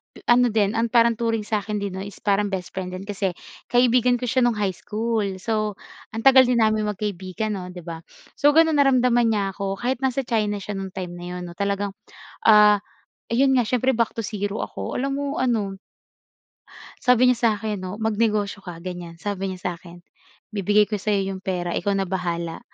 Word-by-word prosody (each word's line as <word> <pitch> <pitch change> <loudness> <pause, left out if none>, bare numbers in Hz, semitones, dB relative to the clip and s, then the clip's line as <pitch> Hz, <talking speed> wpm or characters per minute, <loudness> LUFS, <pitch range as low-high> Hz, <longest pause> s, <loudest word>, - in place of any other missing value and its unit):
pe - - -13
ano 245 0 +5
din 210 -1 +1
ang 230 +1 +2
parang 235 -1 +4
turing 225 -2 0
sa 210 -2 0
akin 210 -1 -3
din 200 -2 -4
'no 190 - -4
is 200 -1 -10
parang 205 0 +2
best 185 -2 -4
friend 185 -1 -4
din 185 - -7
kasi 195 -2 -1 0.4
kaibigan 245 0 +4
ko 250 - -3
siya 255 +1 +2
nung 235 -3 +1
high 195 -3 0
school. 215 -3 -2
So, 215 0 -2 0.4
ang 225 - -4
tagal 265 -1 +8
din 245 -1 +3
namin 215 -1 +2
magkaibigan 210 +1 -3
'no, 180 -1 -6
'di 180 - -9
ba. 165 -1 -6 0.4
So, 290 - +6
gano'n 320 -1 +5
naramdaman 250 -4 +4
niya 200 -3 0
ako 195 -1 -3
kahit 250 +1 -1
nasa 265 0 +1
China 210 -3 0
siya 205 +1 -5
no'ng 190 -1 -5
time 180 -2 -5
na 175 0 -8
'yon 180 - -5
'no 170 - -9
talagang, 200 0 -1 0.6
ah, 210 -1 +7 0.5
ayon 265 +3 +4
nga 245 - +3
s'yempre 250 +3 +1
back 230 -1 0
to 230 - -2
zero 205 0 -3
ako. - - -5
Alam 275 +2 -1
mo 285 - -2 0.2
ano 215 -6 0 1.2
sabi 250 0 +5
niya 250 - +1 0.2
sakin 210 -1 -3
'no, 185 +2 -5
"Mag 220 -1 0
negosyo 210 -3 0
ka", 175 -3 -8
gan'yan, 175 -2 -7
sabi 195 -2 -2
niya 185 -1 -6
sakin, 175 0 -13 0.5
"Bibigay 205 +1 +3
ko 210 -2 -2
sayo 200 0 +1
yung 190 - -7
pera 180 -2 -2
ikaw 200 +2 0
na 195 - +1
bahala", 170 -3 -3
210 Hz, 200 wpm, -23 LUFS, 190-230 Hz, 1.2 s, tagal